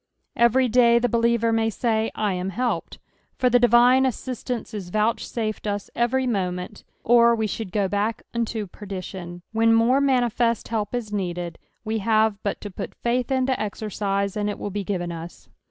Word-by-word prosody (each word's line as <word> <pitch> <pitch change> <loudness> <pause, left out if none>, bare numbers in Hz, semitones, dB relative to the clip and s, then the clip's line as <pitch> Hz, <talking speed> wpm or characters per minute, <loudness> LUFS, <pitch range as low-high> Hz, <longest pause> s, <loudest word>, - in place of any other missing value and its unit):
Everj 240 +1 +3
day 235 -1 +5
the 240 +1 +2
believer 235 0 +2
may 225 0 +2
ctty, 225 0 0
"I 210 -3 0
am 180 +1 -3
helped," 240 +5 -2 0.4
for 250 -1 +2
the 245 - +5
divine 245 +2 +5
aseistance 250 -2 -3
is 195 -4 -6
vouchsafed 215 +1 -1
us 205 -1 -3
every 255 +2 +1
moment, 185 -3 -3 0.2
or 235 0 +5
we 220 -1 -1
should 215 -2 -4
go 200 -1 +1
back 205 +3 -1
unto 230 -2 -2
perdition; 185 -3 -8
when 225 0 +4
more 245 +4 +4
manifest 240 -4 +1
help 220 +1 -2
ia 245 - -1
needed, 175 -4 -3 0.3
we 220 +1 -1
hare 220 +1 +3
bnt 200 - -2
to 205 - -7
put - - -7
faith 240 +1 -1
into 260 0 +2
ezeTcise, 200 -3 -2
and 210 -1 -1
it 205 - -4
will 205 - -5
be 205 +1 -3
given 175 -3 -3
us. 170 +1 -9
220 Hz, 170 wpm, -24 LUFS, 200-240 Hz, 0.4 s, day